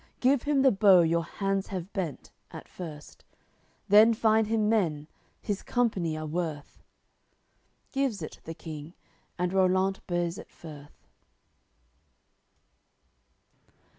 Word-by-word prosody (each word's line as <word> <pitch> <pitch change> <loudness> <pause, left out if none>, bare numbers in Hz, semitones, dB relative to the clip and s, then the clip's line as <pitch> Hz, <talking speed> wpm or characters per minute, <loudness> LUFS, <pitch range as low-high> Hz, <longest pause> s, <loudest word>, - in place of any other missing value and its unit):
Give 260 0 +3
him 285 -2 +1
the 265 - +6
bow 195 -3 +6
your 170 0 +1
hands 195 +2 -2
have 185 -1 -6
bent, 175 -8 -5 0.2
at - - -10
first; 155 -5 -10 0.6
Then 215 +3 +6
find 220 -1 +3
him 220 -1 +1
men, 165 -9 0 0.4
his 205 -2 -3
company 190 -10 -1
are 155 - -5
worth." 155 -2 -5 1.1
Gives 270 -10 -1
it, - - -8
the 165 - -7
King, 155 0 -9 0.4
and 180 +1 -1
Rollant 190 0 +2
bears 175 -1 -2
it - - -11
furth. 145 - -13
185 Hz, 115 wpm, -28 LUFS, 165-215 Hz, 1.1 s, the